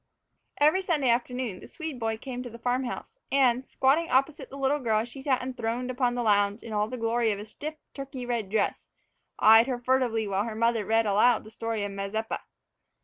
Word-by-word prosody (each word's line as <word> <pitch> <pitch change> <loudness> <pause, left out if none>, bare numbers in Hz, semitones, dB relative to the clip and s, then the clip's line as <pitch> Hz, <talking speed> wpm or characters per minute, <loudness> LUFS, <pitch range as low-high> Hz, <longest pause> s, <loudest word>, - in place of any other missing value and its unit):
EVERY 305 +6 +4
Sunday 310 -9 +1
afternoon 240 -3 -1
the - - -12
Swede 315 -6 -6
boy 225 -1 -1
came 250 +1 -6
to 250 - -7
the 235 - -10
farm 250 +2 -1
house 450 - -7
and, 260 -2 +3
squatting 290 +6 +2
opposite 270 +3 +1
the 275 - -9
little 275 +2 +1
girl 220 -4 +1
as 235 - -6
she 270 +2 -9
sat 265 -2 +1
enthroned 250 0 -3
upon 245 -1 0
the 245 - -1
lounge 205 0 +2
in 225 - -7
all 210 0 +1
the 255 - -6
glory 230 0 +1
of 205 - -2
a 205 - -7
stiff 300 +8 -6 0.2
Turkey 275 -2 -6
red 235 -5 -2
dress, 210 0 -1 0.5
eyed 225 +2 +7
her 255 -2 -1
furtively 240 -3 +1
while 200 +1 0
her 225 -2 -5
mother 230 -2 +1
read 225 0 +3
aloud 215 +4 +3
the 215 - -12
story 225 -1 -3
of 205 - -3
Mazeppa. 200 +3 -3
240 Hz, 210 wpm, -27 LUFS, 220-260 Hz, 0.5 s, eyed